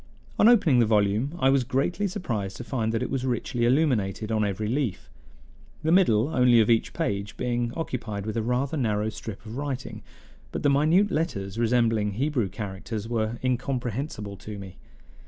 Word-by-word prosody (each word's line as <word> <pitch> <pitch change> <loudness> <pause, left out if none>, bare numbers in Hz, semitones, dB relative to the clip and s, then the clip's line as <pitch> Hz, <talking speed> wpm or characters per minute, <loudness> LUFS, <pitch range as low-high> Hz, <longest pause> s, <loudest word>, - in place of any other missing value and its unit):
On 215 - +7
opening 170 - +5
the 115 - +4
volume 105 +7 +1
I 135 -5 +3
was 135 -2 +3
greatly 145 - 0
surprised 120 - -4
to - - -6
find 115 -3 -1
that 115 - -1
it - - -4
was 135 -2 -1
richly 120 -1 -1
illuminated 120 -6 +1
on 110 -1 +1
every 105 +1 -2
leaf, 125 -4 -2 0.7
the 160 - +1
middle 145 - +4
only 125 -5 +5
of 110 +1 +4
each 115 - +2
page 100 0 -2
being 120 -1 -1
occupied 115 - -4
with 110 - -3
a 115 - 0
rather 125 +6 -1
narrow 110 -4 0
strip 110 0 -8
of 110 +3 -7
writing; 140 -2 -4 0.5
but - - -4
the 145 - +4
minute 165 +8 +3
letters, 100 - -2
resembling 115 -3 +2
Hebrew 130 -3 0
characters, 105 +2 -5
were 115 0 -1
incomprehensible 125 -4 -2
to 105 +2 -8
me. 95 -2 -10
120 Hz, 175 wpm, -26 LUFS, 105-135 Hz, 0.7 s, On